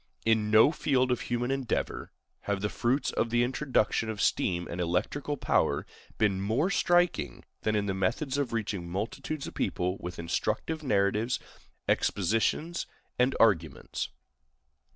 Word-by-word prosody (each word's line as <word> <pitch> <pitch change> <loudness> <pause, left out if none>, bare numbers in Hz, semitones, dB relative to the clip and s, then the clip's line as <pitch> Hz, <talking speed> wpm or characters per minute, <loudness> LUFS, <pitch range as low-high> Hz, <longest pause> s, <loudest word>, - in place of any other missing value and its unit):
In 110 -1 +3
no 110 +6 +7
field 130 -5 +1
of 125 - 0
human 120 +1 -1
endeavor 135 -3 -2 0.4
have 100 -1 0
the 105 - 0
fruits 130 +5 +1
of 115 - 0
the 120 +1 +3
introduction 125 -3 +1
of 110 -2 -4
steam 85 -3 +1
and 90 - -4
electrical 115 - -1
power - - +1 0.3
been 100 -3 +2
more 115 - +1
striking 175 - +2 0.2
than 110 0 0
in 105 -1 +1
the 95 - -1
methods 125 - 0
of 140 -4 -1
reaching 100 -6 -3
multitudes 115 - -3
of - - -7
people 90 +2 -1
with 90 0 -6
instructive 120 - -2
narratives, 105 -1 +1 0.5
expositions, 115 - +1 0.3
and 125 +2 +3
arguments. 85 -10 +1
110 Hz, 140 wpm, -29 LUFS, 100-135 Hz, 0.5 s, no